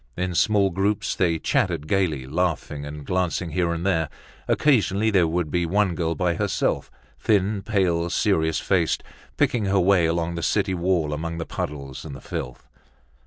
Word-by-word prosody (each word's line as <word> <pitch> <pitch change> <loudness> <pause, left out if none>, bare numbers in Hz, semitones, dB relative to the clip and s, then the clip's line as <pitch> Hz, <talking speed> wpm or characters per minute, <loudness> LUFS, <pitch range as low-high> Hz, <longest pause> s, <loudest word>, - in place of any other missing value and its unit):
In 90 0 -1
small 100 +2 +3
groups 100 +4 0
they 85 -3 +1
chattered 75 -1 0
gaily, 80 -8 0
laughing 75 -1 -2
and 75 0 -8
glancing 90 -1 -1
here 85 +1 +1
and 85 +1 -3
there. 80 -6 +1 0.4
Occasionally 110 -6 +2
there 90 -5 +4
would 80 -2 -1
be 90 -1 +1
one 100 +1 +2
girl 85 -1 -1
by 90 +1 +1
herself, - - -1 0.3
thin, 100 -1 +1
pale, 90 -5 +1
serious 80 -4 +1
faced, - - +1 0.3
picking 115 -4 +2
her 95 0 +2
way 90 -2 +4
along 85 +1 -1
the 85 - -4
city 100 +2 +1
wall 85 -4 0
among 85 +2 -4
the 80 - -3
puddles 70 -3 -5
and 75 -4 -7
the - - -9
filth. 60 -2 -6
85 Hz, 165 wpm, -24 LUFS, 80-95 Hz, 0.4 s, there